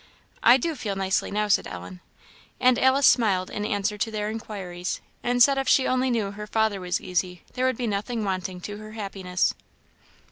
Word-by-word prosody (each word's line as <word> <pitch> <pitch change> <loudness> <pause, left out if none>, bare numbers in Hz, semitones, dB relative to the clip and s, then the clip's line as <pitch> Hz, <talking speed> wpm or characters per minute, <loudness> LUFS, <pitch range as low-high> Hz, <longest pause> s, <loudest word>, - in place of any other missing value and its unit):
"I 260 - +7
do 325 +6 -2
feel 215 -8 -4
nicely 190 0 0
now," 210 +1 0
said 205 - +2
Ellen. 90 0 -9 0.6
And 255 -1 +4
Alice 265 +1 +4
smiled 200 -7 +3
in 210 - -3
answer 210 0 -1
to 225 - 0
their 210 -1 -3
inquiries, 190 -5 -5 0.2
and 245 0 +4
said 275 0 +4
if 270 - -2
she 265 - +5
only 255 0 +1
knew 220 -5 0
her 210 +1 -8
father 220 -2 0
was 180 -1 -1
easy, 180 -1 -2
there 255 +1 +1
would 260 -3 0
be 245 - -2
nothing 215 +2 -2
wanting 185 -1 -3
to 205 +2 -6
her 215 0 -10
happiness. 195 -4 -1
210 Hz, 190 wpm, -25 LUFS, 190-240 Hz, 0.6 s, I